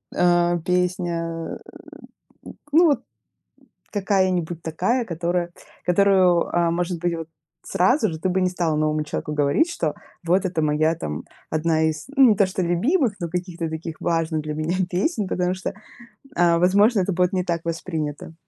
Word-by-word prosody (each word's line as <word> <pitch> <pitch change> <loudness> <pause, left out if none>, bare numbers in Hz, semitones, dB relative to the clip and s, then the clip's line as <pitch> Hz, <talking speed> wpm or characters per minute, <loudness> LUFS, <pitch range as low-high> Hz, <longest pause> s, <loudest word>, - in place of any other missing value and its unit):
а, 175 0 +3
песня. 175 -1 -2 0.9
Э, - - -9 0.2
ну, 335 +4 +6
вот 285 -7 +3 0.9
какая-нибудь 185 -5 0
такая, 190 +10 0
которая 175 -1 -2 0.3
которую, 185 -1 +4
а, 170 -1 +3
может 175 +1 -1
быть, 175 0 0
вот, 165 -1 -7 0.3
сразу 250 - +2
же 160 - -6
ты 185 - 0
бы 185 +1 +1
не 185 - +2
стала 170 -4 -1
новому 155 0 +1
человеку 150 0 -4
говорить, 150 - +2
что 155 - -2 0.3
вот 180 +3 +2
это 180 -4 -1
моя 155 +2 +2
там, 75 - -5 0.3
1 160 0 +1
из 155 -1 -7
не 255 -6 +6
то 200 - +4
что 185 0 -3
любимых, 225 - +1
но 170 - -2
каких-то 175 -1 -4
таких 160 0 -6
важных 165 -2 0
для 150 0 -4
меня 155 +4 -1
песен, 200 - -1
потому 180 0 0
что, 190 +1 -5 0.6
а, 170 -1 +4
возможно, 200 +5 +4
это 190 +1 0
будет 180 +1 +1
не 180 -1 0
так 170 -2 -1
воспринято. 160 -2 -4
175 Hz, 160 wpm, -23 LUFS, 165-185 Hz, 0.9 s, ну